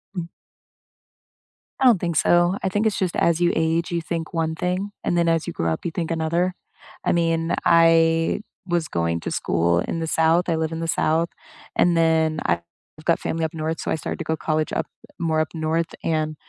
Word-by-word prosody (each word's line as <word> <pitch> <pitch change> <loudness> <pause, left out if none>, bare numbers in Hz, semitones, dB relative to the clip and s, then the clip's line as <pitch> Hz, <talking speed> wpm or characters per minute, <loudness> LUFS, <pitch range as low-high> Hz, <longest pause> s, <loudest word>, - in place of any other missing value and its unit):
Mm. 175 -2 -3 1.5
I 265 - +2
don't 230 -8 +6
think 170 -2 -2
so, 175 +4 +3
I 190 - +1
think 205 +3 +1
it's 210 - -1
just 185 -4 -1
as 170 -1 +2
you 175 0 +2
age, 165 +1 0
you 170 - -1
think 165 0 -4
one 160 -1 -1
thing, 185 +4 -2
and 175 - 0
then 170 - +2
as 165 -1 +1
you 175 - -5
grow 85 0 -1
up, 80 - -4
you 170 - -1
think 165 -1 -3
another. 170 +2 0 0.5
I - - +3
mean, 165 -1 +1
I 165 +1 +4 0.3
was 170 -3 0
going 85 0 -1
to - - -4
school 85 0 +1
in 165 - -2
the 160 - -2
South, 165 +2 +2
I 165 - +2
live 160 0 -1
in 165 - -4
the 165 - -3
South, 165 +1 +1 0.5
and 175 -1 +3
then 160 -1 +2
I've 85 0 +1 0.4
got 170 - +3
family 165 0 -2
up 160 - -5
North, 160 0 -3
so - - -3
I - - +2
started 155 - -4
to - - -4
go 160 - -1
college 155 0 -1
up, - - -1 0.3
more 160 -2 +1
up 155 - 0
North, 160 +1 -1
and 155 -1 0
165 Hz, 210 wpm, -23 LUFS, 160-170 Hz, 1.5 s, don't